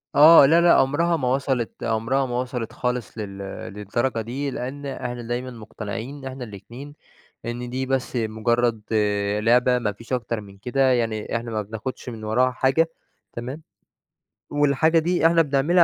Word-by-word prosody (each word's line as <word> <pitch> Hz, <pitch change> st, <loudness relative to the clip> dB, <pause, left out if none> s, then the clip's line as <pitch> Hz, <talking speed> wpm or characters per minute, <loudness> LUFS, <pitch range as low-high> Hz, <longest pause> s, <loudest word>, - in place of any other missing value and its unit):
آه 150 Hz, +1 st, +9 dB
لا، 165 Hz, +5 st, +5 dB
لأ، 170 Hz, 0 st, +6 dB
عُمرها 165 Hz, +5 st, +3 dB
ما 130 Hz, -5 st, -1 dB
وصَلت 130 Hz, -2 st, -1 dB
عُمرها 115 Hz, +4 st, 0 dB
ما 125 Hz, -1 st, -2 dB
وصَلت 125 Hz, -3 st, -5 dB
خالص 125 Hz, -2 st, -3 dB
لل 100 Hz, -3 st, -6 dB, 0.4 s
للدرجة 115 Hz, +4 st, -1 dB
دي، 135 Hz, +5 st, -3 dB
لأن 135 Hz, +4 st, -5 dB
إحنا 125 Hz, -3 st, -4 dB
دايمًا 120 Hz, +2 st, -4 dB
مقتنعين 115 Hz, +2 st, -7 dB
إن 135 Hz, -, -11 dB
إحنا 130 Hz, -1 st, -6 dB
الاتنين 120 Hz, +7 st, -10 dB, 0.5 s
إن 120 Hz, +1 st, -4 dB
دي 130 Hz, +1 st, -2 dB
بس 130 Hz, -1 st, -1 dB
مجرّد 115 Hz, 0 st, 0 dB, 0.6 s
لعبة، 125 Hz, +3 st, +4 dB
ما 110 Hz, -4 st, -1 dB
فيش 115 Hz, +5 st, -11 dB
أكتر 115 Hz, -2 st, -1 dB
من 100 Hz, -1 st, -14 dB
كده، 130 Hz, +4 st, +2 dB
يعني 115 Hz, -3 st, -1 dB
إحنا 115 Hz, 0 st, -4 dB
ما 110 Hz, -1 st, -1 dB
بناخدش 110 Hz, +5 st, -6 dB
من 110 Hz, -2 st, -7 dB
وراها 125 Hz, +4 st, +2 dB
حاجة. 130 Hz, +6 st, +2 dB, 0.4 s
تمام، 130 Hz, +7 st, -6 dB, 0.9 s
والحاجة 145 Hz, +3 st, +3 dB
دي 170 Hz, 0 st, +3 dB
إحنا 165 Hz, 0 st, +4 dB
بنعملها 155 Hz, +4 st, +3 dB
125 Hz, 160 wpm, -23 LUFS, 115-135 Hz, 0.9 s, آه